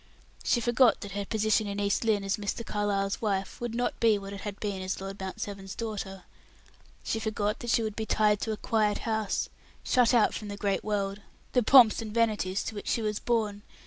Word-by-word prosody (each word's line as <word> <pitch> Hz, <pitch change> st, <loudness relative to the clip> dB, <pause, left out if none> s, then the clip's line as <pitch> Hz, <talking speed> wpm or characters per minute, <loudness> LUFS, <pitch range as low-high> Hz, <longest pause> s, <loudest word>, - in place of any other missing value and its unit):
She 240 Hz, -, +2 dB
forgot 240 Hz, +1 st, +4 dB
that 200 Hz, -, -7 dB
her 200 Hz, +1 st, -3 dB
position 215 Hz, 0 st, +1 dB
in 200 Hz, 0 st, -3 dB
East 200 Hz, +2 st, +1 dB
Lynne 215 Hz, -3 st, +2 dB
as 195 Hz, 0 st, 0 dB
Mr. 210 Hz, +2 st, -3 dB
Carlyle's 200 Hz, -1 st, -1 dB
wife 195 Hz, -2 st, -2 dB
would 240 Hz, -1 st, -3 dB
not 245 Hz, +1 st, -1 dB
be 225 Hz, -2 st, +4 dB
what 195 Hz, 0 st, -7 dB
it 200 Hz, -, -7 dB
had 205 Hz, -2 st, -6 dB
been 200 Hz, -3 st, -3 dB
as 185 Hz, 0 st, -3 dB
Lord 195 Hz, +1 st, -7 dB
Mount 190 Hz, -1 st, -5 dB
Severn's 195 Hz, -2 st, -6 dB
daughter; 200 Hz, -4 st, -5 dB, 0.8 s
she 225 Hz, -, -1 dB
forgot 210 Hz, -1 st, -1 dB
that 240 Hz, -, -5 dB
she 230 Hz, -, +3 dB
would 215 Hz, -2 st, -3 dB
be 220 Hz, -1 st, -3 dB
tied 210 Hz, -1 st, +3 dB
to 220 Hz, -, -1 dB
a 215 Hz, -, -3 dB
quiet 215 Hz, -2 st, +1 dB
house, 220 Hz, -3 st, 0 dB, 0.4 s
shut 250 Hz, -3 st, +4 dB
out 235 Hz, -4 st, +4 dB
from 215 Hz, -, -5 dB
the 205 Hz, 0 st, -6 dB
great 200 Hz, -1 st, 0 dB
world, 200 Hz, -1 st, -2 dB, 0.3 s
the 250 Hz, -, +4 dB
pomps 240 Hz, -2 st, +7 dB
and 220 Hz, -1 st, -6 dB
vanities 210 Hz, -5 st, +1 dB
to -, -, -5 dB
which 205 Hz, -, -7 dB
she 230 Hz, -, 0 dB
was 210 Hz, -1 st, -1 dB
born. 215 Hz, -4 st, 0 dB
210 Hz, 215 wpm, -29 LUFS, 200-225 Hz, 0.8 s, pomps